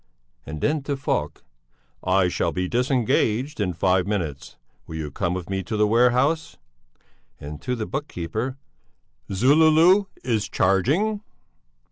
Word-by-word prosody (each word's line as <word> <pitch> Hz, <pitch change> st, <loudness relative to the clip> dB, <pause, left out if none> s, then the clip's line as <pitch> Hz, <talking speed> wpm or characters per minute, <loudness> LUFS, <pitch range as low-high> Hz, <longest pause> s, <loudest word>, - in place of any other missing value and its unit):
and 75 Hz, 0 st, -6 dB
then 150 Hz, 0 st, +1 dB
to 140 Hz, 0 st, -3 dB
Falk: 135 Hz, -, -2 dB, 0.6 s
"I 95 Hz, 0 st, +3 dB
shall 90 Hz, -, -1 dB
be 90 Hz, 0 st, -2 dB
disengaged 125 Hz, +2 st, 0 dB
in 95 Hz, -4 st, 0 dB
five 95 Hz, +2 st, +1 dB
minutes. 85 Hz, -10 st, -4 dB, 0.3 s
Will 80 Hz, -, -7 dB
you 75 Hz, -2 st, -4 dB
come 90 Hz, +4 st, -1 dB
with 90 Hz, -2 st, -5 dB
me 95 Hz, 0 st, -2 dB
to 110 Hz, +3 st, -4 dB
the 105 Hz, -, +4 dB
warehouse?" 125 Hz, +8 st, +2 dB, 0.8 s
And 75 Hz, +1 st, -8 dB
to 125 Hz, -1 st, -2 dB
the 110 Hz, -2 st, -3 dB
book 145 Hz, +5 st, -4 dB
keeper: 110 Hz, -, -4 dB, 0.7 s
"Zululu 160 Hz, -, +5 dB, 0.2 s
is 115 Hz, -5 st, -1 dB
charging?" 150 Hz, -, +1 dB
110 Hz, 135 wpm, -23 LUFS, 90-140 Hz, 0.8 s, Zululu